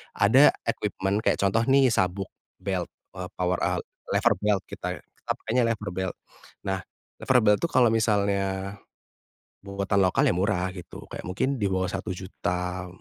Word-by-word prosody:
ada 125 +8 +6 0.2
equipment 95 +2 -1
kayak - - +3
contoh 100 +3 +2
nih 135 -1 +5
sabuk, 95 -3 0 0.3
belt, 95 -3 -1 0.3
eee, 90 - -4
power 90 0 0
al - - 0 0.3
lever - - +4
belt 105 -2 +1
kita - - -4
kita - - -7
pakainya 125 +2 0
lever 105 -3 -2
belt. 95 -1 -3 0.5
Nah, 95 0 0 0.4
lever 130 - +4
belt 105 -1 +5
itu - - +2
kalau 125 -2 +5
misalnya 100 -3 0 0.8
buatan 100 0 -1
lokal 90 - +3
ya - - +2
murah 95 -1 0
gitu, 90 -3 -9
kayak - - -6
mungkin 130 +9 0
di 100 - +2
bawah 95 -1 0
Rp1.000.000, 90 -1 -3
100 Hz, 150 wpm, -26 LUFS, 95-105 Hz, 0.8 s, ada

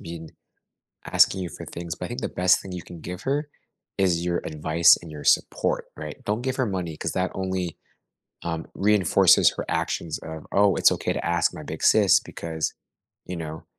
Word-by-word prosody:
been 85 -3 -8 0.7
asking 95 - +3
you 90 - -4
for - - -9
things 85 -1 -6
but - - -6
I - - -9
think - - -5
the - - -2
best 90 0 +3
thing 95 - -9
you 90 - -5
can 85 -2 -11
give 90 +2 -7
her 145 +2 -1 0.5
is 90 -3 +2
your 85 -1 0
advice 80 +2 +4
and 85 - -10
your 75 -2 -9
support, - - +1
right? 75 -1 -7
Don't 105 +4 -1
give 130 0 -1
her 130 - +1
money 90 -6 -3
'cause - - -3
that 95 0 -1
only, 95 -3 -3 0.7
um, 80 -1 -4
reinforces 100 -3 +5
her - - -3
actions 80 -2 -2
of, 80 -1 -8
"Oh, 100 -2 +4
it's - - +5
okay - - -1
to - - -4
ask 85 -1 +2
my 75 - -8
big 80 +2 -7
sis 100 -4 +6
because, 80 -1 -4 0.5
you 90 - -5
know, 80 -1 -7
85 Hz, 195 wpm, -25 LUFS, 80-95 Hz, 0.7 s, sis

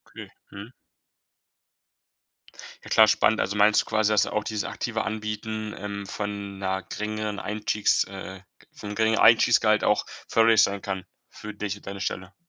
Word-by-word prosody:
Okay. - - -9 0.2
Mhm. 100 +4 -9 2.1
Ja, - - -11
klar 110 -1 +7
spannend. 110 0 +3
Also, 100 - -1
meinst 105 +1 +5
du - - -10
quasi, 110 -1 +1
dass 105 -2 +3
auch 105 - -2
dieses 105 -2 -3
aktive 110 +4 -3
Anbieten, 110 0 -4
ähm, 100 -1 -6
von 100 -1 -6
'ner 95 0 -2
geringeren 105 -1 -4
Einstiegs, 105 0 0
äh 95 -1 -9 0.3
vom 105 0 -8
geringeren 110 +1 +2
Einstiegsgehalt 110 -1 +5
auch - - +2 0.2
förderlich 115 -1 +4
sein 100 0 +1
kann? 95 -2 -4 0.3
Für 105 0 -9
dich 105 -1 -4
und 100 - -19
deine 100 0 -6
Stelle. 95 0 -4
105 Hz, 155 wpm, -25 LUFS, 100-110 Hz, 2.1 s, klar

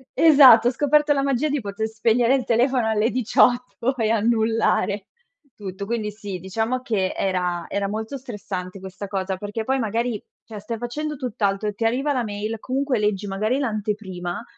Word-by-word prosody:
esatto, 275 -8 +8
ho - - -1
scoperto 295 +3 +3
la 275 - 0
magia 275 +1 +1
di 290 -2 -1
poter 205 +1 -3
spegnere 230 +3 +2
il 270 -2 +1
telefono 245 0 +2
alle 220 +2 +1
18 250 +1 +1
e 225 -3 +1
annullare 220 -2 +1 0.5
tutto. 200 -1 -6
Quindi 220 -1 -2
sì, 205 -3 -7
diciamo 220 +7 -2
che 210 -7 -1
era 180 -2 -1
era 200 0 -1
molto 220 +6 -4
stressante 195 -7 -6
questa 190 +1 -8
cosa, 190 -1 -3
perché 205 +3 -4
poi 265 +4 0
magari, 230 -1 -1 0.2
cioè 215 -2 -8
stai 225 +2 -5
facendo 300 +6 -4
tutt'altro 210 -6 -1
e - - -5
ti 225 - -2
arriva 265 +6 +1
la 255 -3 0
mail, 215 +1 -4
comunque 265 +2 -1
leggi 210 -1 -1
magari 215 +7 -1
l'anteprima 210 -6 -3
220 Hz, 170 wpm, -23 LUFS, 205-250 Hz, 0.5 s, esatto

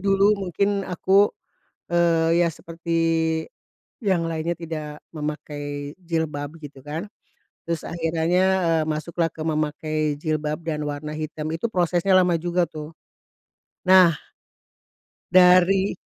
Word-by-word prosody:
dulu 195 +1 +4
mungkin 200 +2 0
aku, 195 +3 +3 0.6
eee, 170 -1 +3
ya 170 - +2
seperti 165 +1 -5 1.0
yang 190 -6 +1
lainnya 165 +1 -2
tidak 155 -3 -6
memakai 145 -2 -5
jilbab 160 -3 -3
gitu 145 -3 -11
kan, 155 +5 -4 0.6
terus 170 -2 -2
akhirannya, 165 +2 0 0.2
eee, 165 -1 +2
masuklah 160 +2 -1
ke - - -19
memakai 155 0 -2 0.2
jilbab 155 0 -2
dan 155 -2 -3
warna 150 +1 -5
hitam, 155 0 -5
itu 170 - -2
prosesnya 180 0 +1
lama 180 -2 +4
juga 175 +1 0
tuh. 155 0 -8 1.0
Nah, 185 -4 +7 1.1
dari 185 +2 +5
165 Hz, 110 wpm, -23 LUFS, 155-180 Hz, 1.1 s, Nah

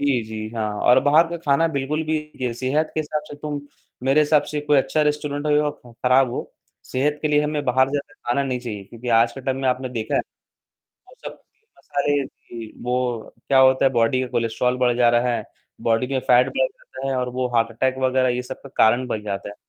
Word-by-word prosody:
जी, 140 -5 +1
जी, 110 0 -6
हाँ 110 -1 -1
और 125 +1 +6
बाहर 155 +4 +5
का 170 - -4
खाना 160 -1 +2
बिल्कुल 150 +1 -2
भी 155 0 -1 0.3
ये 125 -2 -1
सेहत 135 +6 0
के 155 - +1
हिसाब 150 0 -3
से - - -8
तुम 145 0 -4 0.4
मेरे 135 +3 +4
हिसाब 150 0 +4
से 150 - -1
कोई 145 0 +2
अच्छा 135 +3 +1
रेस्टोरेंट 150 0 -1
होए 150 0 +3
या 150 0 +1 0.2
खराब 125 +2 +2
हो, - - -5 0.3
सेहत 145 +3 -1
के 155 - +1
लिए 150 0 +3
हमें 150 -1 -2
बाहर 130 +1 +3
ज़्यादा 145 0 -4
खाना 125 +4 +2
नहीं 130 -2 -2
चाहिए। 105 -5 -6
क्योंकि 115 +4 -9
आज 115 0 +4
के 135 - -8
टाइम 130 0 -2
में 130 - +2
आपने 130 +1 -1
देखा 115 -3 -3
है, - - +3 0.9
वो - - -17
सब - - -7 0.4
मसाले 145 -5 0
जी। 115 -3 -11
वो 125 -2 -2
क्या 135 - +4
होता 130 0 +5
है 135 - +4
बॉडी 120 +1 +2
का 130 - -2
कोलेस्ट्रॉल 125 +2 0
बढ़ 125 -1 +2
जा 120 -1 +5
रहा 120 +1 +2
है, - - -4 0.4
बॉडी 115 +2 +1
में 135 0 -1
फैट 125 0 +4
बढ़ 130 - +3
जाता 130 +1 -9
है 135 - 0
और 125 0 -1
वो 125 0 -1
हार्ट 115 0 +3
अटैक 130 +3 0
वगैरह 130 0 +2
ये 125 - -1
सब 130 - -8
का 140 - -10
कारण 120 +3 +4
बन 110 -3 -3
जाता 100 -1 -4
है। 100 - -10
130 Hz, 230 wpm, -22 LUFS, 120-145 Hz, 0.9 s, और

